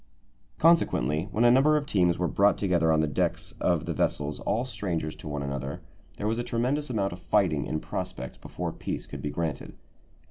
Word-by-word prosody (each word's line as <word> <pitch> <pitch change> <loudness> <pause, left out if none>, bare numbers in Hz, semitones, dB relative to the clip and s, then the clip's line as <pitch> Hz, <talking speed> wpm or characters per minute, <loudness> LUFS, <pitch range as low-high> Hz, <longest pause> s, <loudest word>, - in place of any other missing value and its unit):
Consequently, 80 - +3
when 110 - +1
a 120 - +7
number 145 +5 +5
of 145 - -2
teams 90 - +2
were 90 - 0
brought 100 +3 +3
together 85 -5 +2
on 80 0 +3
the 80 - +1
decks 75 - -1
of - - +1
the - - -2
vessels, 75 0 -1
all 120 +3 0
strangers 90 -9 -3
to - - -9
one 75 -1 -3
another, 70 0 -4 0.4
there 105 - -4
was 110 +2 0
a - - -1
tremendous 125 +5 -1
amount 100 -6 0
of 90 - -9
fighting 85 -2 +1
in 80 - -1
prospect 65 -4 -5
before - - -4
peace - - -5
could - - -8
be 75 - -2
granted. 80 -2 -4
90 Hz, 200 wpm, -27 LUFS, 75-120 Hz, 0.4 s, a